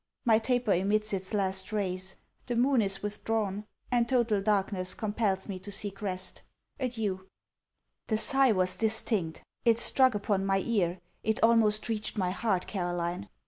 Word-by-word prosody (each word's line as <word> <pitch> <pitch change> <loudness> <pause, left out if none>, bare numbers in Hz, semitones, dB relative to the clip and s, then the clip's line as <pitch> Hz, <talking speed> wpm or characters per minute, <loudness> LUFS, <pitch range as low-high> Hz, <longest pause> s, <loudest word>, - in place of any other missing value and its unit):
My 225 -2 +5
taper 245 -2 +1
emits 210 +4 +1
its 190 -1 -2
last 190 -1 0
rays. 185 -3 -2 0.3
The 245 - -2
moon 250 +1 +3
is 195 -1 0
withdrawn; 210 -1 -2 0.3
and 240 -1 +2
total 235 -5 +2
darkness 195 -2 0
compels 205 -3 -1
me 190 -3 -5
to 205 +2 -7
seek 200 0 -3
rest 185 -2 -2 0.4
Adieu! 215 -7 -3 0.8
The 220 - +1
sigh 270 +2 +4
was 185 -3 +1
distinct. 215 -6 0 0.2
It 230 -2 +4
struck 255 0 +4
upon 205 -1 0
my 195 0 +1
ear. 185 -6 0 0.2
It 220 0 0
almost 225 -2 +4
reached 220 -1 -3
my 185 -3 0
heart, 190 -2 -1
Caroline. 175 0 -3
205 Hz, 150 wpm, -29 LUFS, 190-225 Hz, 0.8 s, My